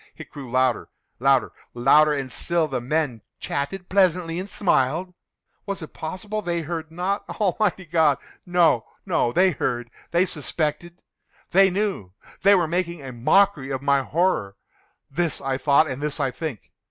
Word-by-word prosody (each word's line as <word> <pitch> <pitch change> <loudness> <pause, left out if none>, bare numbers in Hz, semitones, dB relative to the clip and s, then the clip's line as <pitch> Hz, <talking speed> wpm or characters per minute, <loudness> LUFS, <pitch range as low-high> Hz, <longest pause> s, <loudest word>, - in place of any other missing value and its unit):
It - - -11
grew 135 -4 -9
louder—louder—louder! 130 +2 +1
And 135 -2 -4
still 170 -2 0
the 130 -4 -3
men 135 -3 -1 0.2
chatted 180 +6 -3
pleasantly, 180 -3 +2
and 190 +2 -6
smiled. 175 -1 +1 0.5
Was 200 -4 -3
it 155 - -10
possible 195 +6 -5
they 175 -3 -2
heard 160 0 -5
not? 185 +4 -2 0.2
Almighty 195 -2 +1
God!—no, 160 -2 +2 0.2
no! 120 - +1
They 185 +6 +4
heard!—they 130 +6 -2
suspected!—they 175 +4 -1
knew!—they 195 - 0
were 175 -4 +2
making 170 -2 -2
a 135 - -6
mockery 140 +4 +2
of 135 -1 -3
my 140 -1 +3
horror!—this 155 - -3
I 135 -1 -2
thought, 140 +2 +4
and 130 -1 -5
this 150 +1 -2
I 135 -3 0
think. 140 -4 -6
160 Hz, 130 wpm, -24 LUFS, 135-180 Hz, 0.5 s, They